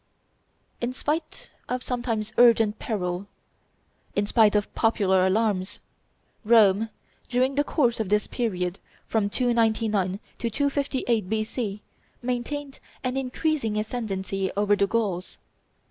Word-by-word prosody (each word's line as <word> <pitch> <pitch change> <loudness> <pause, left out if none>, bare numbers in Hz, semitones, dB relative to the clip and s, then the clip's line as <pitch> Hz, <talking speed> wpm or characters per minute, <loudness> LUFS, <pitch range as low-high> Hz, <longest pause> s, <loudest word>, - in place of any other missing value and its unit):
In 240 +1 -1
spite 305 +4 -3 0.2
of 250 0 -2
sometimes 230 -4 -2
urgent 225 -3 +5
peril, 185 -3 -3 0.9
in 205 - +2
spite 215 0 +4
of 205 0 0
popular 190 -5 +3
alarms, 205 -1 0 0.6
Rome, 220 -1 +5 0.4
during 255 +2 +2
the 290 +1 +2
course 245 -6 +1
of 215 -4 -1
this 210 +1 +2
period, 185 -6 -2 0.3
from 215 -3 0
299 220 -5 +1 0.2
to 235 - -1
258 265 -5 0
B.C., 215 -1 -2 0.4
maintained 270 +3 -3 0.2
an 255 0 -1
increasing 270 -3 -1
ascendency 195 -4 -2
over 205 0 +3
the 200 0 +2
Gauls. 195 -5 -2
220 Hz, 115 wpm, -26 LUFS, 205-245 Hz, 0.9 s, urgent